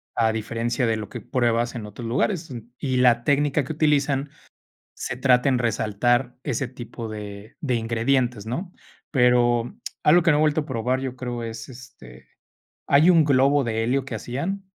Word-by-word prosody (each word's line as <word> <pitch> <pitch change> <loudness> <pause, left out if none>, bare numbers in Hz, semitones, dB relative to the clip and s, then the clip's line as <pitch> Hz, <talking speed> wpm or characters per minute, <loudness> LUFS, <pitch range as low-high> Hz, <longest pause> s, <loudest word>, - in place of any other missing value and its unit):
a 110 -1 +2
diferencia 115 +3 -2
de 115 - +1
lo 110 -1 -6
que - - -7
pruebas 120 -1 0
en 115 -3 -5
otros 110 +3 -8
lugares, 160 - -1 0.3
y 130 -2 -1
la 120 -2 +3
técnica 145 0 +2
que 160 - -4
utilizan 145 -2 +1 0.7
se 130 - -4
trata 125 +1 +3
en 130 -2 +2
resaltar 120 +2 0
ese 135 -2 -2
tipo 120 -2 -8
de 105 0 -8
de 130 -5 -1
ingredientes, 115 0 0
¿no?, 170 - -4 0.4
pero, 125 -2 +3 0.3
algo 175 +4 +6
que 170 - +3
no 150 - +4
he - - +2
vuelto 155 0 +2
a - - -12
probar, 130 +1 -1
yo 130 -1 -5
creo 125 -2 -5
es, 115 0 -7
este, 65 - -14 0.6
hay 150 +5 +5
un 165 -3 +5
globo 140 0 +3
de 115 -2 -1
helio 130 +3 0
que 135 - -7
hacían. 155 - -4
125 Hz, 175 wpm, -24 LUFS, 115-140 Hz, 0.7 s, algo